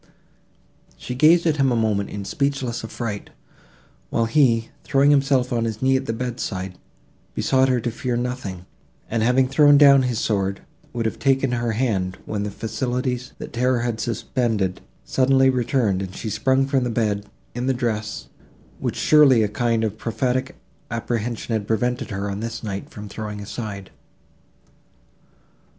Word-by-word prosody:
She 125 - -6
gazed 160 +7 +5
at 155 -2 +2
him 135 -1 +3
for 125 - +2
a - - +1
moment 105 -3 0
in 100 -1 -6
speechless 135 -4 -1
affright, 110 -2 -5 0.8
while 115 - +1
he, 115 -3 +3
throwing 140 +1 +3
himself 135 -3 +2
on 115 -1 +1
his 110 -1 -3
knee 130 +1 +3
at 130 0 -1
the - - 0
bedside, 115 -6 -4 0.6
besought 130 0 +2
her 125 -1 +2
to 120 - -2
fear 120 +1 -2
nothing, 120 -8 -4 0.5
and, 115 0 0
having 125 +3 +3
thrown 145 +1 +6
down 140 -2 +7
his 125 -3 -1
sword, 100 -3 -1 0.3
would 115 -2 -3
have 110 - -2
taken 135 -1 +2
her 120 -1 -1
hand, 100 -6 -1
when 105 -2 -3
the 105 - -2
faculties, 125 +3 -3
that - - -8
terror 125 0 +1
had 120 -2 -2
suspended, 110 -3 -1 0.2
suddenly 130 - +3
returned, 120 -6 +1
and 95 -1 -6
she 110 - -4
sprung 130 +5 +2
from 135 -2 +1
the 125 - -1
bed, 105 -3 -1 0.3
in 125 +2 -3
the - - +3
dress, 110 -4 -3 0.5
which - - -2
surely 140 -7 +5
a - - +2
kind 115 +1 0
of 110 0 -2
prophetic 130 +3 -1 0.3
apprehension 115 0 -3
had 105 -2 -1
prevented 120 +2 -1
her, 100 0 -3
on 100 0 -4
this 115 +1 -5
night, 100 -2 -5
from 105 0 -9
throwing 105 0 -6
aside. 100 -2 -6
120 Hz, 165 wpm, -22 LUFS, 105-130 Hz, 0.8 s, down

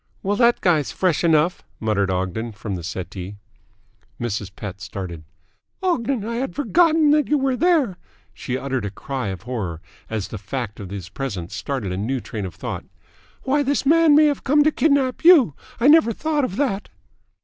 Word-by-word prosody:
"Well, 200 +2 +1
that 240 -1 +4
guy's 160 -6 +2
fresh 180 -4 0
enough," 165 +1 +3 0.2
muttered 105 -3 0
Ogden 95 +5 -2
from 105 -1 -6
the 90 - -4
settee. 95 +2 -6 0.8
Mrs. 105 -4 -3
Pett 100 -1 -7
started. 95 -5 -6 0.6
"Ogden! 260 - 0
I 230 +1 -3
had 265 +2 -3
forgotten 315 +1 +3
that 300 -1 +3
you 300 - +2
were 270 -2 +1
there." 295 - +2 0.4
She 125 -1 -4
uttered 130 -3 -2
a 100 - -2
cry 130 +4 -5
of 95 -1 -5
horror, 105 -10 -4 0.3
as 110 -3 -3
the 105 - -6
fact 105 +2 -5
of 100 -3 -7
his 95 -3 -7
presence 100 -7 -5
started 100 +1 -3
a 90 - -3
new 125 +7 -1
train 105 -5 -5
of 90 - -11
thought. - - -5 0.6
"Why, 280 +2 +2
this 285 0 0
man 320 0 +5
may 305 +1 +7
have 290 -1 0
come 295 +2 +4
to 310 - +3
kidnap 280 -5 +1
you! 320 - +7 0.3
I 240 - +3
never 295 -6 +6
thought 300 +2 0
of 190 - -5
that." 225 -6 -1
140 Hz, 180 wpm, -22 LUFS, -, 0.8 s, may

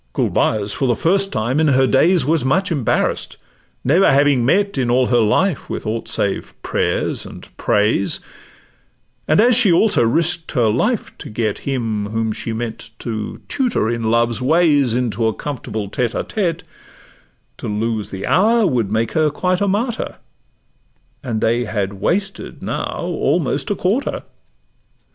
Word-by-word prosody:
Gulbeyaz, 105 -2 +1
for 135 - -1
the 120 - +2
first 195 - +1
time 120 +6 0
in 160 - +3
her 135 -2 +4
days, 160 +4 +3
Was 155 -1 +1
much 185 +8 +1
embarrass'd, 140 -8 -1 0.5
never 165 +9 +4
having 140 -2 +3
met 200 +10 +2
In 130 -3 0
all 125 +1 +3
her 120 -1 +3
life 140 - +1
with - - -5
aught 115 +1 -3
save 100 -3 -2
prayers - - -1
and - - -11
praise; 105 -1 +1 1.1
And 155 - +3
as 240 +2 +5
she 225 -6 +4
also 200 - +4
risk'd 165 +8 +1
her 120 -6 +2
life 210 - -1
to - - -8
get 110 -1 -2
Him 115 -6 -2
whom 110 +1 -1
she 115 - -5
meant 115 0 -5
to 110 -2 -5
tutor 240 - 0
in 115 -1 -1
love's 115 +1 +1
ways 145 -4 +3
Into 115 -3 0
a 110 - -1
comfortable 110 -7 -5
tete 120 +3 -2
a - - -1
tete, 175 -7 -2 0.9
To - - -6
lose 110 0 -2
the 95 0 -5
hour 220 +5 +3
would 120 - 0
make 110 +1 0
her 155 -1 +2
quite 180 +5 -1
a 200 - +2
martyr, 220 +5 -2 1.0
And 115 -4 -3
they 120 +2 +1
had 100 -2 -2
wasted 195 +1 -2
now - - -3
almost - - -1
a 205 - 0
quarter. 205 +10 -1
125 Hz, 155 wpm, -19 LUFS, 110-175 Hz, 1.1 s, as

